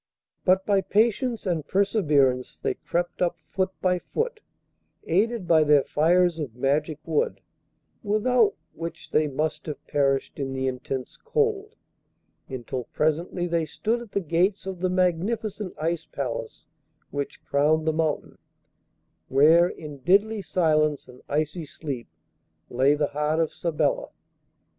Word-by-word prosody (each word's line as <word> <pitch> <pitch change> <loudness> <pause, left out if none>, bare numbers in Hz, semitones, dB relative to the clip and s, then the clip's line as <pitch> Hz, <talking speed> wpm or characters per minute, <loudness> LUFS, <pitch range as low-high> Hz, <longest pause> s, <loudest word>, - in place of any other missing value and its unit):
But 190 +1 +4
by 200 -2 +3
patience 230 +4 +1
and 165 -6 -1
perseverance 150 - +2
they - - -1
crept 175 +1 -3
up 175 -1 +1
foot 185 +4 -1
by 180 -1 +2
foot, 460 - -3 0.6
aided 205 +3 +1
by 160 -2 +5
their 145 -2 +5
fires 175 +2 +3
of 135 -7 -5
magic 145 +4 0
wood, 160 -2 0 0.6
without 215 +1 +2 0.2
which 165 +1 -7
they 155 0 +3
must 155 +3 -2
have 150 - -6
perished 135 -1 0
in 135 -1 -2
the 130 0 -2
intense 130 0 -4
cold, 445 -2 -1 0.7
until 130 -1 -4
presently 165 +3 -1
they 170 -2 0
stood 230 +7 -1
at 235 -4 -12
the 200 - +1
gates 180 +5 +1
of 190 -2 -5
the 185 +1 0
magnificent 185 +3 -1
Ice 165 +1 -1
Palace 130 -4 -5 0.4
which 145 -1 -4
crowned 155 +3 +2
the 160 - +2
mountain, 155 -1 -2 0.9
where, 160 +6 +5
in 150 -3 -9
deadly 205 +8 +3
silence 155 -5 +1
and 125 0 -14
icy 155 +3 -1
sleep, 140 -6 -6 0.6
lay 135 +4 +4
the 150 -1 0
heart 150 +2 0
of 165 -2 0
Sabella. 165 -3 0
165 Hz, 135 wpm, -25 LUFS, 145-190 Hz, 0.9 s, by